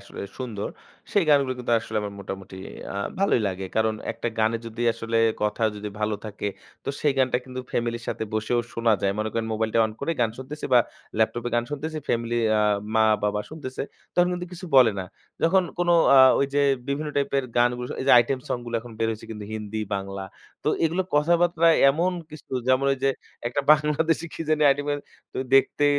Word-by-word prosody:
আসলে 100 Hz, -, -10 dB, 0.2 s
সুন্দর 115 Hz, -6 st, -4 dB, 0.4 s
সেই 200 Hz, -, +3 dB
গানগুলো 140 Hz, -3 st, +4 dB
কিন্তু 120 Hz, -1 st, -2 dB
আসলে 110 Hz, -1 st, -6 dB
আমার 100 Hz, -1 st, -4 dB
মোটামুটি 95 Hz, -1 st, -7 dB, 0.4 s
আ -, -, -3 dB, 0.2 s
ভালোই 195 Hz, -10 st, +3 dB
লাগে। 95 Hz, 0 st, -5 dB
কারণ 110 Hz, 0 st, +2 dB, 0.2 s
একটা 120 Hz, -, -3 dB
গানে 110 Hz, +1 st, +2 dB
যদি 115 Hz, +1 st, -5 dB
আসলে 115 Hz, 0 st, -3 dB, 0.3 s
কথা 105 Hz, +2 st, -1 dB
যদি 105 Hz, 0 st, -5 dB
ভালো 105 Hz, 0 st, 0 dB
থাকে, 105 Hz, -1 st, -4 dB, 0.4 s
তো -, -, -5 dB
সেই 150 Hz, -, +3 dB
গানটা 130 Hz, -2 st, +3 dB
কিন্তু 130 Hz, 0 st, -6 dB
ফ্যামিলির 115 Hz, 0 st, -2 dB
সাথে -, -, -2 dB
বসেও 110 Hz, +3 st, +1 dB
শোনা 115 Hz, -1 st, +2 dB
যায়। 100 Hz, 0 st, +2 dB
মনে 110 Hz, 0 st, 0 dB
করেন 115 Hz, -1 st, -1 dB
মোবাইলটা 110 Hz, +1 st, 0 dB
অন 110 Hz, -, -7 dB
করে 165 Hz, +4 st, 0 dB
গান 115 Hz, -, +2 dB
শুনতেছি 140 Hz, +4 st, -7 dB
বা 125 Hz, -, +9 dB, 0.4 s
ল্যাপটপে 120 Hz, +2 st, +1 dB
গান 120 Hz, 0 st, +2 dB
শুনতেছি। 155 Hz, +2 st, -4 dB
ফ্যামিলি 120 Hz, 0 st, 0 dB, 0.2 s
আ -, -, +3 dB, 0.3 s
মা-বাবা 105 Hz, -2 st, +2 dB
শুনতেছে। 145 Hz, -5 st, -6 dB, 0.3 s
তখন 175 Hz, 0 st, +4 dB
কিন্তু 180 Hz, 0 st, -4 dB
কিছু 180 Hz, +1 st, -8 dB
বলে 120 Hz, -5 st, +7 dB
না। 95 Hz, -, -3 dB, 0.4 s
যখন 185 Hz, +3 st, +4 dB, 0.2 s
কোনো 175 Hz, 0 st, +3 dB, 0.2 s
আ -, -, +9 dB, 0.2 s
ওইযে 140 Hz, +1 st, +1 dB, 0.3 s
বিভিন্ন 145 Hz, +2 st, -1 dB
টাইপের 140 Hz, -1 st, +1 dB
গানগু 120 Hz, +1 st, +2 dB, 0.2 s
এই -, -, -3 dB
যে -, -, +7 dB
আইটেম 120 Hz, +3 st, +2 dB
সংগুলো 120 Hz, -1 st, -3 dB
এখন 120 Hz, 0 st, -11 dB
বের 115 Hz, -, +1 dB
হয়েছে 110 Hz, -1 st, -6 dB
কিন্তু 105 Hz, -2 st, -6 dB
হিন্দি 110 Hz, 0 st, -4 dB
বাংলা। 95 Hz, 0 st, -4 dB, 0.4 s
তো -, -, +2 dB, 0.2 s
এগুলো 170 Hz, +4 st, +1 dB
কথাবার্তা 170 Hz, +2 st, +3 dB, 0.2 s
এমন 170 Hz, +6 st, 0 dB, 0.2 s
কিছু 155 Hz, -2 st, -12 dB, 0.2 s
যেমন 130 Hz, +1 st, +3 dB
ওইযে 135 Hz, 0 st, +1 dB, 0.4 s
একটা 120 Hz, +4 st, 0 dB
বাংলাদেশী 155 Hz, +2 st, +1 dB
কি -, -, -4 dB
জানি 155 Hz, -1 st, +2 dB
আইটেমের 145 Hz, +1 st, 0 dB, 0.3 s
তো -, -, -5 dB, 0.2 s
দেখতে 135 Hz, +2 st, +4 dB
120 Hz, 185 wpm, -25 LUFS, 110-145 Hz, 0.4 s, বা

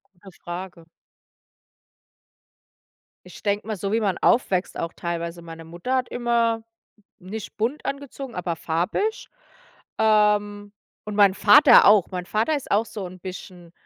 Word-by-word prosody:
Gute 190 Hz, +2 st, -15 dB
Frage. 175 Hz, -1 st, -7 dB, 2.4 s
Ich -, -, -14 dB
denke 205 Hz, +1 st, -1 dB
mal, 215 Hz, -2 st, -3 dB
so 195 Hz, +2 st, -3 dB
wie 225 Hz, -, +2 dB
man 195 Hz, -4 st, 0 dB
aufwächst 195 Hz, -6 st, +1 dB
auch 165 Hz, -, -4 dB
teilweise, 170 Hz, 0 st, -5 dB
meine 165 Hz, -1 st, -10 dB
Mutter 175 Hz, +11 st, -3 dB
hat 255 Hz, -1 st, -1 dB
immer 235 Hz, -2 st, 0 dB, 0.6 s
nicht 205 Hz, +3 st, -8 dB
bunt 235 Hz, +7 st, -2 dB
angezogen, 275 Hz, -2 st, -6 dB
aber 175 Hz, -1 st, -3 dB
farbig. 175 Hz, -, -2 dB, 0.7 s
Ähm, 205 Hz, -1 st, +2 dB, 0.3 s
und 210 Hz, -1 st, -5 dB
mein 200 Hz, -2 st, +5 dB
Vater 205 Hz, 0 st, +7 dB
auch. 205 Hz, -3 st, +6 dB
Mein 180 Hz, -1 st, -5 dB
Vater 220 Hz, -, 0 dB
ist 280 Hz, -, -9 dB
auch 210 Hz, +3 st, +2 dB
so 205 Hz, -3 st, -7 dB
'n 185 Hz, +1 st, -10 dB
bisschen 180 Hz, -2 st, -10 dB
205 Hz, 140 wpm, -23 LUFS, 180-220 Hz, 2.4 s, Vater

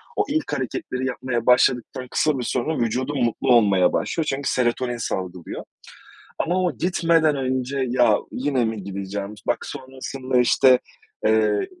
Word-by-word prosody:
o -, -, +2 dB
ilk 310 Hz, +1 st, -1 dB
hareketleri 130 Hz, 0 st, -3 dB
yapmaya 125 Hz, -2 st, -3 dB
başladıktan 125 Hz, +1 st, +2 dB
kısa 155 Hz, -3 st, +1 dB
bir -, -, -2 dB
süre 120 Hz, +1 st, -1 dB
sonra, 160 Hz, +3 st, -2 dB
vücudum 130 Hz, +5 st, -1 dB
mutlu 120 Hz, +3 st, 0 dB
olmaya 100 Hz, -6 st, +4 dB
başlıyor. 165 Hz, -, -1 dB
Çünkü 140 Hz, -1 st, -1 dB
serotonin 120 Hz, 0 st, 0 dB
salgılıyor 90 Hz, -5 st, -5 dB, 0.8 s
ama 185 Hz, +2 st, +1 dB
o 180 Hz, -, -1 dB
gitmeden 165 Hz, -3 st, +2 dB
önce 130 Hz, 0 st, -1 dB
ya 120 Hz, -4 st, +4 dB
yine 130 Hz, -2 st, 0 dB
mi 110 Hz, -3 st, -3 dB
gideceğim, 100 Hz, +1 st, -5 dB
bak -, -, 0 dB
sonrasında 130 Hz, -1 st, -3 dB
işte, 125 Hz, +1 st, +5 dB, 0.5 s
ııı, 110 Hz, -1 st, +2 dB
125 Hz, 140 wpm, -23 LUFS, 115-135 Hz, 0.8 s, işte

